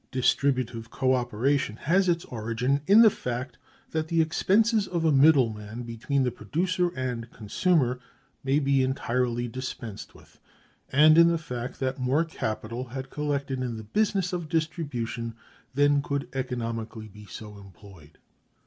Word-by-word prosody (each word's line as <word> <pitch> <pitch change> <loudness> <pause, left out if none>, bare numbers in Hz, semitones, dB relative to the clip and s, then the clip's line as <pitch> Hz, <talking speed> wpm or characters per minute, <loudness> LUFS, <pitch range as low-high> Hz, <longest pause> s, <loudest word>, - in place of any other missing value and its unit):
Distributive 125 -3 0
co 130 +1 +1
operation 125 0 0
has 180 +9 +2
its 170 -1 0
origin 120 +4 -1
in 215 +4 +8
the 220 - +7
fact 125 -2 -5 0.3
that 160 0 -1
the 165 0 0
expenses 205 +7 +2
of 170 -2 -1
a 160 - +4
middle 135 -5 +5
man 105 +3 -8
between 120 +4 -1
the 125 - 0
producer 175 - -1
and 125 -3 -3
consumer 125 - 0 0.4
may 135 +1 +2
be 140 -2 +2
entirely 125 -2 0
dispensed 120 -3 -7
with, - - -19 0.5
and 155 +3 +6
in 170 - +8
the 170 0 +2
fact 125 -5 -6
that 130 0 -2
more 135 +6 +2
capital 115 -4 -4
had 130 +1 -7
collected 140 -3 -2
in 120 -3 -3
the 110 - -7
business 190 - 0
of 175 -3 -3
distribution 140 -8 -2 0.4
than 145 0 +4
could 140 -1 -3
economically 115 -4 -4
be 105 0 -14
so 105 -1 -9
employed. 95 -5 -15
130 Hz, 150 wpm, -27 LUFS, 115-155 Hz, 0.5 s, in